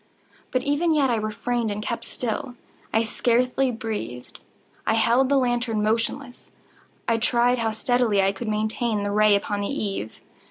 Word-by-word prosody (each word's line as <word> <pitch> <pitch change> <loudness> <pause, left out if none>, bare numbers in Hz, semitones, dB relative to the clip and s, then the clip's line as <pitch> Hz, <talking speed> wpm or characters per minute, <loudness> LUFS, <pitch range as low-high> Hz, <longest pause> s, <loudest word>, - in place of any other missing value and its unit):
But 255 - 0
even 310 +3 +1
yet 275 -4 +3
I - - +2
refrained 225 +2 -2
and 205 0 -3
kept 235 +2 -3
still. 245 +1 -3 0.4
I 225 - +2
scarcely 250 +3 +1
breathed. 215 - -5 0.5
I 220 - +3
held 235 +4 +3
the 280 - +4
lantern 240 -4 0
motionless. 235 +4 -2 0.6
I 230 - +2
tried 240 +2 +2
how 225 -1 +1
steadily 220 -1 +1
I 195 0 +3
could 210 +4 -7
maintain 215 0 0
the 205 - -1
ray 210 0 +5
upon 205 0 -1
the 200 - -1
eve. 200 - -4
230 Hz, 160 wpm, -24 LUFS, 215-250 Hz, 0.6 s, ray